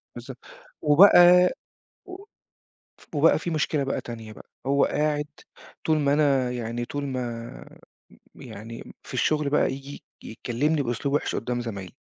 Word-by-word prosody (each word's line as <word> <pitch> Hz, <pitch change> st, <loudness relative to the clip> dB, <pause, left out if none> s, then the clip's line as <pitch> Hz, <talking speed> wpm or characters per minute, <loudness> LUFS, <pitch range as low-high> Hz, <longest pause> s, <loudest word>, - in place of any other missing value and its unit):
بالضبط، -, -, -9 dB, 0.4 s
وبقى 180 Hz, +2 st, +7 dB, 0.6 s
و 380 Hz, +1 st, -10 dB, 0.8 s
ف -, -, -20 dB
وبقى 155 Hz, +2 st, +4 dB
في 170 Hz, -, -5 dB
مشكلة 150 Hz, -2 st, 0 dB
بقى 135 Hz, -, -2 dB
تانية 115 Hz, -2 st, -9 dB
بقى، -, -, -14 dB, 0.2 s
هو 140 Hz, +1 st, +3 dB
قاعد 150 Hz, 0 st, -1 dB, 0.6 s
طول 155 Hz, -1 st, +2 dB
ما 140 Hz, -1 st, +2 dB
أنا 140 Hz, -4 st, +2 dB
يعني 120 Hz, -1 st, -4 dB
طول 145 Hz, +3 st, -5 dB
ما 120 Hz, -3 st, -5 dB, 0.8 s
م -, -, -14 dB
يعني 115 Hz, +3 st, -10 dB
في -, -, -11 dB
الشغل 150 Hz, -2 st, +1 dB
بقى 150 Hz, -, +2 dB
ييجي 140 Hz, +1 st, -9 dB, 0.2 s
يكّلمني 140 Hz, +7 st, -1 dB
بأسلوب 135 Hz, +3 st, -2 dB
وِحِش -, -, -1 dB
قُدّام 120 Hz, +1 st, -3 dB
زمايلي، 100 Hz, -7 st, -7 dB
140 Hz, 145 wpm, -25 LUFS, 120-150 Hz, 0.8 s, وبقى